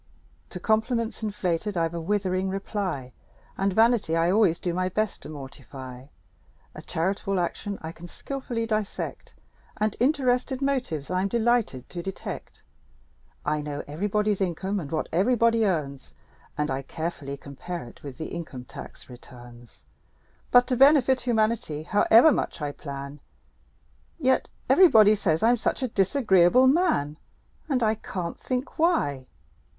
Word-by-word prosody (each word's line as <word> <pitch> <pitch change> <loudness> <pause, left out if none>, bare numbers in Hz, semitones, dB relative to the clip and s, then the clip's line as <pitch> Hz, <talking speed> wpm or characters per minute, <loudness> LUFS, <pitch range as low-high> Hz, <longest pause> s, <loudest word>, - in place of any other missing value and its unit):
To - - -7
compliments 225 +1 0
inflated 200 -2 -2
I've 165 0 0
a 170 - -4
withering 190 0 0
reply; 190 - -3 0.4
And 195 +1 0
vanity 220 -5 +3
I 165 +1 +2
always 195 -5 +3
do 175 - -2
my 185 +1 0
best 215 +2 -2
to - - -10
mortify; 135 -2 -10 0.7
A - - -9
charitable 195 +3 -1
action 200 +3 -3
I 160 - -5
can 170 +1 -11
skilfully 245 +1 -4
dissect: 215 -3 -4 0.4
And 215 -1 0
interested 255 -1 +1
motives 255 - -2
I'm 185 +2 +1
delighted 230 - 0
to 175 - -5
detect. 190 +2 -7 0.8
I 150 0 0
know 145 -1 -5
everybody's 205 +6 -1
income 190 +2 -1
and 145 -5 -7
what 160 - -1
everybody 230 +4 +3
earns, 140 -7 -3 0.4
And 150 -1 -1
I 130 +1 -2
carefully 145 -1 -5
compare 165 +6 -7
it 120 - -14
with 140 -3 -9
the 160 - -5
income 155 -7 -7
tax 135 - -11
returns; 120 -2 -14 0.7
But 245 0 +6
to 255 - +2
benefit 265 -1 +5
humanity, 220 -9 0
however 225 - +6
much 245 - -2
I 145 -2 -2
plan, 140 0 -8 1.0
Yet 260 -4 +2 0.2
everybody 220 - +7
says 180 -5 0
I'm 240 +2 +5
such 260 - -1
a - - +1
disagreeable 200 0 +4
man! 260 - +2 0.5
And 255 -4 +1
I 215 0 +3
can't 180 -5 -5
think 255 +3 -4
why! 145 - +1
190 Hz, 140 wpm, -26 LUFS, 155-230 Hz, 1.0 s, everybody